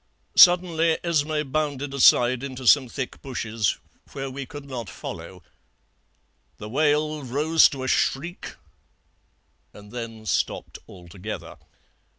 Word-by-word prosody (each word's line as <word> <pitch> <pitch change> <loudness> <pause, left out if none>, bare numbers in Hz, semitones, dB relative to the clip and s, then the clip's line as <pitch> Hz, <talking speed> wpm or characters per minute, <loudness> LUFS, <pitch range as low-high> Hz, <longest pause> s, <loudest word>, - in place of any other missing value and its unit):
Suddenly 170 -2 +5
Esmé 155 -4 -1
bounded 145 -2 -2
aside 125 -2 +5
into 130 -2 -7
some 130 0 +5
thick 130 +1 -6
bushes, 115 -6 -2 0.4
where 135 -1 -5
we 135 0 -7
could 145 +1 -9
not 120 -7 -6
follow; 85 +2 -9 1.1
the 105 - -8
wail 150 +4 +1
rose 150 +6 +4
to 135 -2 -6
a - - -3
shriek 170 +7 -1 1.2
and 105 0 -14
then 115 -2 -7
stopped - - -2
altogether. 90 +3 -9
135 Hz, 115 wpm, -24 LUFS, 115-150 Hz, 1.2 s, Suddenly